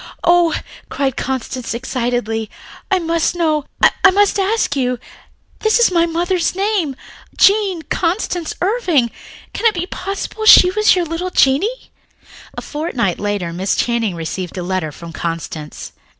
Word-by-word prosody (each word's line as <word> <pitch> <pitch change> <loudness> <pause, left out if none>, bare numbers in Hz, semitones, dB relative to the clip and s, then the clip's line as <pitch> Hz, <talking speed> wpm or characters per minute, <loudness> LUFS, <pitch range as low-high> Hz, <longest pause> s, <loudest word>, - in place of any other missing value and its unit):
"Oh," 345 -1 +4 0.3
cried 270 -2 -1
Constance 255 -2 -3
excitedly. 235 -3 -2 0.4
"I 385 - +3
must 335 -1 0
know, 310 -4 0 0.4
I 390 - +9
must 405 +1 +2
ask 395 -5 0
you. 250 -2 0 0.6
This 435 0 +2
is 475 -5 +4
my 340 -1 +3
mother's 345 +1 0
name, 385 -8 0 0.4
Jean 395 -5 +3
Constance 350 +1 -2
Irving, 355 - +1 0.4
can 465 - +2
it 435 - +1
be 350 0 -2
possible 395 +3 -4
she 365 -3 +9
was 425 +1 +4
your 355 -2 0
little 330 +3 -3
Jeannie?" 365 - +1 0.7
A - - -5
fortnight 275 - -2
later 205 -5 -2
Miss 185 +3 -1
Channing 230 -6 0
received 175 +3 -5
a 180 - -3
letter 180 -4 -2
from 165 +2 -10
Constance. 165 -2 -5
325 Hz, 140 wpm, -18 LUFS, 235-375 Hz, 0.7 s, I